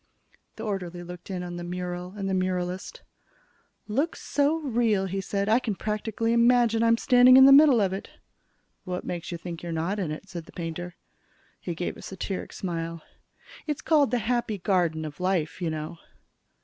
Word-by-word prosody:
The 220 Hz, -, -7 dB
orderly 180 Hz, -5 st, -4 dB
looked 175 Hz, +1 st, -10 dB
in 185 Hz, -2 st, -3 dB
at 175 Hz, -1 st, -6 dB
the 175 Hz, -, -5 dB
mural 180 Hz, +1 st, -5 dB
and 195 Hz, -1 st, -3 dB
the 190 Hz, -, -1 dB
muralist. 185 Hz, 0 st, -2 dB, 0.9 s
"Looks 275 Hz, +10 st, -1 dB
so 290 Hz, +2 st, +1 dB
real," 235 Hz, -9 st, +1 dB
he 195 Hz, +1 st, -3 dB
said, 200 Hz, +1 st, -2 dB
"I 225 Hz, +3 st, +4 dB
can 225 Hz, -5 st, -3 dB
practically 220 Hz, +2 st, -1 dB
imagine 235 Hz, -1 st, +4 dB
I'm 230 Hz, 0 st, +4 dB
standing 250 Hz, +1 st, +7 dB
in 265 Hz, -, +9 dB
the 275 Hz, -, +8 dB
middle 280 Hz, -3 st, +8 dB
of 195 Hz, -2 st, +1 dB
it." 195 Hz, -, -6 dB, 0.7 s
"What 180 Hz, 0 st, -4 dB
makes 175 Hz, 0 st, -5 dB
you 170 Hz, -, -3 dB
think 170 Hz, 0 st, -7 dB
you're 175 Hz, -, -5 dB
not 165 Hz, +6 st, -1 dB
in 180 Hz, -5 st, -2 dB
it?" 155 Hz, +6 st, -6 dB
said 170 Hz, -4 st, -7 dB
the -, -, -16 dB
painter. 175 Hz, +1 st, -5 dB, 0.6 s
He 175 Hz, -, -5 dB
gave 175 Hz, -, -4 dB
a -, -, -11 dB
satiric 190 Hz, 0 st, -5 dB
smile. 165 Hz, -3 st, -4 dB, 0.6 s
"It's 300 Hz, -2 st, -3 dB
called 295 Hz, -5 st, +4 dB
'The 245 Hz, -, +1 dB
Happy 235 Hz, -3 st, 0 dB
Garden 175 Hz, -4 st, 0 dB
of 150 Hz, +1 st, -8 dB
Life,' 180 Hz, -3 st, -1 dB
you 170 Hz, -, 0 dB
know." 155 Hz, +1 st, -5 dB
190 Hz, 185 wpm, -26 LUFS, 175-230 Hz, 0.9 s, in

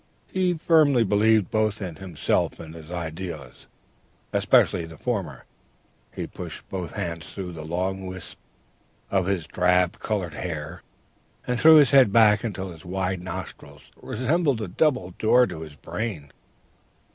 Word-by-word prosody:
He 185 Hz, -1 st, +1 dB
firmly 155 Hz, -6 st, +4 dB
believed 105 Hz, -1 st, +3 dB
both 110 Hz, -1 st, +1 dB
in 90 Hz, -6 st, -6 dB
himself 90 Hz, -7 st, -1 dB
and 80 Hz, -1 st, -9 dB
his 80 Hz, -1 st, -11 dB
ideas, 85 Hz, -5 st, -6 dB, 0.7 s
especially 85 Hz, -, +3 dB
the 80 Hz, -1 st, -12 dB
former. 95 Hz, -, -3 dB, 0.7 s
He -, -, -5 dB
pushed -, -, -9 dB
both 90 Hz, -3 st, -5 dB
hands 85 Hz, -5 st, -5 dB
through 95 Hz, -3 st, -6 dB
the 80 Hz, -2 st, -8 dB
long 95 Hz, +4 st, -3 dB
wisps 95 Hz, -1 st, -8 dB, 0.8 s
of 95 Hz, -2 st, +1 dB
his 95 Hz, -5 st, -1 dB
drab 90 Hz, +1 st, +1 dB
colored 95 Hz, -7 st, -2 dB
hair, 80 Hz, 0 st, -5 dB, 0.6 s
and 125 Hz, -1 st, -1 dB
threw 160 Hz, 0 st, +8 dB
his 145 Hz, -4 st, +6 dB
head 135 Hz, -7 st, +6 dB
back 105 Hz, -1 st, +5 dB
until 95 Hz, -5 st, -4 dB
his 80 Hz, -2 st, -13 dB
wide 95 Hz, 0 st, -2 dB
nostrils 90 Hz, -1 st, -9 dB
resembled 140 Hz, +2 st, 0 dB
a -, -, -4 dB
double 125 Hz, -, +1 dB
door 125 Hz, +3 st, +5 dB
to 85 Hz, -7 st, -7 dB
his 75 Hz, -2 st, -9 dB
brain. 85 Hz, -, -5 dB
95 Hz, 145 wpm, -25 LUFS, 85-110 Hz, 0.8 s, threw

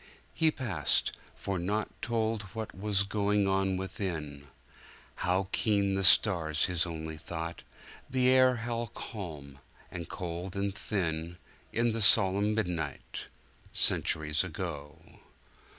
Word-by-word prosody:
He 160 Hz, -, +3 dB
passed—for 95 Hz, -, -1 dB
naught 105 Hz, +5 st, -1 dB
Told 115 Hz, -2 st, 0 dB
what 110 Hz, -1 st, -5 dB
was 100 Hz, 0 st, +1 dB
going 100 Hz, 0 st, +1 dB
on 95 Hz, -1 st, +1 dB
within:How 90 Hz, +1 st, -5 dB
keen 100 Hz, -3 st, +1 dB
the 95 Hz, 0 st, 0 dB
stars, 85 Hz, -6 st, +4 dB
his 90 Hz, -1 st, 0 dB
only 80 Hz, -1 st, -5 dB
thought— 85 Hz, +1 st, -6 dB, 0.5 s
The 130 Hz, -1 st, +2 dB
air 130 Hz, -1 st, +5 dB
how 120 Hz, 0 st, -3 dB
calm, 75 Hz, -9 st, -7 dB, 0.3 s
and 85 Hz, -2 st, -6 dB
cold 90 Hz, +1 st, -5 dB
and 100 Hz, 0 st, -1 dB
thin 85 Hz, -5 st, -3 dB, 0.3 s
In 115 Hz, +1 st, +1 dB
the 115 Hz, -, -2 dB
solemn 100 Hz, +2 st, +5 dB
midnight, 85 Hz, -8 st, -3 dB, 0.5 s
Centuries 75 Hz, +1 st, +3 dB
ago! 80 Hz, -5 st, -5 dB
95 Hz, 110 wpm, -30 LUFS, 80-105 Hz, 0.5 s, air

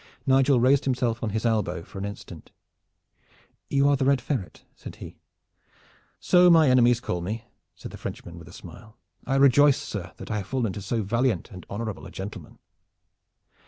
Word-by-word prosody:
Nigel 135 Hz, 0 st, +4 dB
raised 130 Hz, +3 st, +3 dB
himself 120 Hz, -3 st, -1 dB
on 115 Hz, -, -2 dB
his 110 Hz, +3 st, -3 dB
elbow 100 Hz, -7 st, 0 dB
for 95 Hz, -, -10 dB
an 100 Hz, -, -4 dB
instant. 100 Hz, 0 st, -9 dB, 1.2 s
"You 140 Hz, 0 st, +2 dB
are 145 Hz, -, +4 dB
the 135 Hz, -1 st, -1 dB
Red 140 Hz, -1 st, +3 dB
Ferret?" 125 Hz, -7 st, -5 dB
said -, -, -10 dB
he. -, -, -11 dB, 1.0 s
"So 180 Hz, 0 st, +5 dB
my 160 Hz, -5 st, +6 dB
enemies 120 Hz, -1 st, +4 dB
call 90 Hz, -6 st, -3 dB
me," 110 Hz, +6 st, -4 dB, 0.3 s
said -, -, -10 dB
the -, -, -9 dB
Frenchman, 85 Hz, -1 st, -8 dB
with 85 Hz, -, -13 dB
a -, -, -12 dB
smile. 110 Hz, -1 st, -13 dB, 0.3 s
"I 135 Hz, -, 0 dB
rejoice, 140 Hz, +1 st, +5 dB
sir, -, -, -6 dB
that -, -, -8 dB
I 105 Hz, -, -1 dB
have 100 Hz, -, -5 dB
fallen 120 Hz, -7 st, -1 dB
to 100 Hz, -, -7 dB
so 110 Hz, +3 st, -2 dB
valiant 115 Hz, 0 st, -1 dB
and 90 Hz, -2 st, -11 dB
honorable 110 Hz, 0 st, -5 dB
a -, -, -13 dB
gentleman." 95 Hz, +2 st, -8 dB
120 Hz, 180 wpm, -25 LUFS, 100-135 Hz, 1.2 s, my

